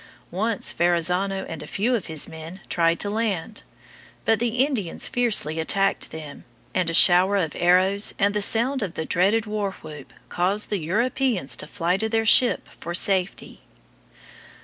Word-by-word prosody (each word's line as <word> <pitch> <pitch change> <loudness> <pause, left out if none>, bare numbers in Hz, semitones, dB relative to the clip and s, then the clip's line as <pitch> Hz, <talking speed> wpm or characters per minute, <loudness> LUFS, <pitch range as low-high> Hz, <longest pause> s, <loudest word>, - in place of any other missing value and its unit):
Once 210 +3 -2
Verrazzano 180 +3 0
and 165 - -7
a - - -9
few 225 +6 -1
of 225 -7 -2
his 160 -3 -2
men 160 +3 -10
tried 170 -1 +1
to - - -1
land. 210 -2 -3 0.6
But 225 -2 +2
the 235 -1 -2
Indians 220 - -3
fiercely 220 - +1
attacked 195 +4 0
them, 155 -3 -10 0.3
and 180 -2 0
a - - -3
shower 185 +4 +6
of 165 -6 -2
arrows 185 +3 +2
and 200 0 +1
the 210 - -1
sound 240 +6 +2
of 190 -5 -5
the 160 - -4
dreaded 200 +7 +1
war 210 -2 -3
whoop 150 -3 -11 0.2
caused 195 +5 -1
the 205 - 0
Europeans 225 - -1
to - - -5
fly 175 +3 -1
to 220 +2 -3
their 225 0 0
ship 245 +3 +5
for 170 +1 -8
safety. 190 0 0
195 Hz, 165 wpm, -23 LUFS, 170-220 Hz, 0.6 s, shower